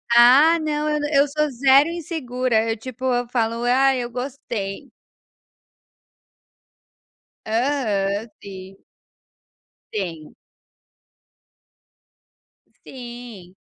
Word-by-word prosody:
Ah 275 +8 +7
não, 305 -1 -2
eu 300 0 0
na 295 - -2
eu 280 +1 +4
sou 300 +1 -1
zero 270 +4 +4
insegura, 255 -9 -2
eu, 225 - -1
tipo, 255 +2 -10
eu 245 -1 0
falo: 230 -1 -1
"Ah, 265 +2 +4
eu 240 -1 -3
gostei." 240 -6 -6 2.6
Aham, 220 -4 -1
sim. 190 -1 -10 1.2
Sim. 170 -7 -5 2.5
Sim. 240 -7 -10
245 Hz, 85 wpm, -22 LUFS, 220-280 Hz, 2.6 s, Ah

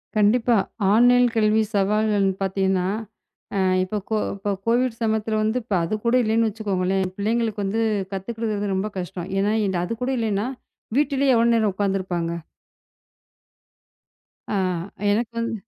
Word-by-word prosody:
கண்டிப்பா 225 +3 +3 0.4
ஆன்லைன்ல 245 +1 +5
கல்வி 215 0 +3
சவால்கள்ன்னு 205 0 +2
பார்த்தீங்கன்னா, 190 -1 0 0.7
அஹ் 185 -1 +2
இப்ப 185 +3 -3
கொ 220 - +1 0.2
இப்ப 200 0 -2
கோவிட் 240 0 +1
சமயத்துல 220 -1 0
வந்து 220 +3 +1 0.2
அது 165 +6 -1
கூட 235 +1 +3
இல்லைன்னு 225 0 +2
வச்சுக்கோங்களேன் 195 -3 -1
பிள்ளைங்களுக்கு 220 0 -1
வந்து 215 +4 0 0.3
கத்துக்கிறது 205 0 -3
ரொம்ப 195 +3 -1
கஷ்டம். 180 0 -6
ஏன்னா 205 +2 +1 0.3
அது 205 - -3
கூட 260 - 0
இல்லைன்னா 215 -1 0 0.5
வீட்டிலேயே 280 -2 +2
எவ்வளவு 235 +1 +4
நேரம் 215 -3 +2
உட்கார்ந்து 195 0 0
இருப்பாங்க? 175 -2 -2 2.2
ஆ - - 0 0.6
எனக்கு 230 +3 0
வந்து 230 0 -2
215 Hz, 125 wpm, -23 LUFS, 195-230 Hz, 2.2 s, ஆன்லைன்ல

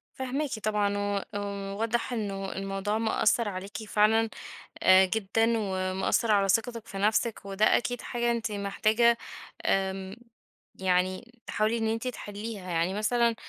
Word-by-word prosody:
فاهماكِ 265 -1 -2
طبعًا، 205 -1 +1
و 205 0 -1 0.6
واضح 230 +2 -1
إنه 195 -4 -3
الموضوع 195 +2 -2
مأثر 225 0 +2
عليِكِ 195 +1 -6
فعلًا 220 +1 +3 0.5
آآ، 190 0 +7
جدًا، 220 +3 +1
ومأثر 190 +2 0
على 200 -2 +4
ثقتِك 225 +3 0
في 195 - -6
نفسِك، 215 +2 +1
وده 200 +2 +3
أكيد 245 0 -2
حاجة 240 0 -1
أنتِ 230 -2 -1
محتاجة 215 +4 +2 0.5
آمم، 190 +1 0 0.6
يعني 185 +6 -1
تحاولي 220 +1 0
إن 225 -1 0
أنتِ 225 +3 -1
تحليها، 205 -4 -6
يعني 170 +2 0
مثلًا 235 +3 +2
210 Hz, 130 wpm, -28 LUFS, 195-230 Hz, 0.6 s, آآ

